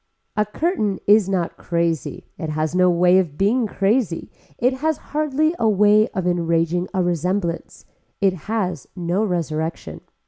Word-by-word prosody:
A 210 Hz, -1 st, +1 dB
curtain 215 Hz, -, -1 dB
is 205 Hz, -1 st, +5 dB
not 180 Hz, -3 st, -1 dB
crazy, 170 Hz, -2 st, -2 dB
it 160 Hz, -3 st, -5 dB
has 155 Hz, +1 st, -2 dB
no 180 Hz, 0 st, +4 dB
way 180 Hz, +1 st, +4 dB
of 160 Hz, -6 st, -2 dB
being 220 Hz, +4 st, +2 dB
crazy, 200 Hz, -2 st, 0 dB, 0.3 s
it 250 Hz, +2 st, +2 dB
has 315 Hz, +1 st, 0 dB, 0.2 s
hardly 305 Hz, +1 st, +1 dB
a 225 Hz, -, +3 dB
way 210 Hz, +1 st, +4 dB
of 185 Hz, -, -1 dB
enraging 170 Hz, 0 st, 0 dB
a 190 Hz, -2 st, 0 dB
resemblance, 175 Hz, +1 st, -2 dB, 0.3 s
it 195 Hz, -2 st, +3 dB, 0.2 s
has 185 Hz, -9 st, -2 dB
no 180 Hz, +3 st, -1 dB
resurrection. 165 Hz, -4 st, -3 dB
185 Hz, 145 wpm, -21 LUFS, 170-215 Hz, 0.3 s, is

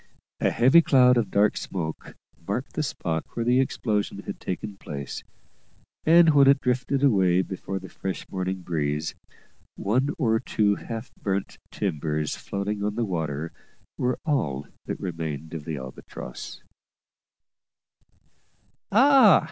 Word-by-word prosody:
A -, -, +3 dB
heavy 135 Hz, +8 st, +6 dB
cloud 125 Hz, -5 st, +5 dB
of 115 Hz, -5 st, +1 dB
dark 105 Hz, +2 st, +3 dB
smoke 80 Hz, -4 st, -5 dB, 0.3 s
marked 120 Hz, +7 st, -3 dB
the -, -, -1 dB
spot 80 Hz, -, -2 dB
where 115 Hz, -, -1 dB
the 125 Hz, +2 st, +4 dB
explosion 110 Hz, -5 st, -1 dB
had -, -, -6 dB
taken 100 Hz, +2 st, -5 dB
place; 70 Hz, -8 st, -6 dB, 0.8 s
and 165 Hz, 0 st, +7 dB
when 140 Hz, -2 st, +6 dB
it 140 Hz, 0 st, +6 dB
drifted 130 Hz, +2 st, 0 dB
away 95 Hz, -8 st, +4 dB
before 95 Hz, 0 st, -5 dB
the -, -, -7 dB
fresh 95 Hz, -1 st, -5 dB
morning 95 Hz, 0 st, -3 dB
breeze, 75 Hz, -3 st, -2 dB, 0.6 s
one 130 Hz, +7 st, +1 dB
or 110 Hz, -7 st, +2 dB
two 105 Hz, -4 st, +1 dB
half 115 Hz, +3 st, -6 dB
burnt 100 Hz, -2 st, -2 dB
timbers 75 Hz, -5 st, -2 dB
floating 100 Hz, +1 st, -3 dB
on 105 Hz, 0 st, -1 dB
the 120 Hz, 0 st, 0 dB
water 80 Hz, -4 st, -3 dB, 0.4 s
were 125 Hz, 0 st, 0 dB
all 75 Hz, -, 0 dB, 0.2 s
that -, -, -3 dB
remained 80 Hz, -3 st, -5 dB
of 80 Hz, -3 st, -6 dB
the 80 Hz, -3 st, -3 dB
Albatross. 65 Hz, -1 st, -8 dB, 2.3 s
"Ah!" 255 Hz, -1 st, +7 dB
100 Hz, 130 wpm, -26 LUFS, 85-125 Hz, 2.3 s, and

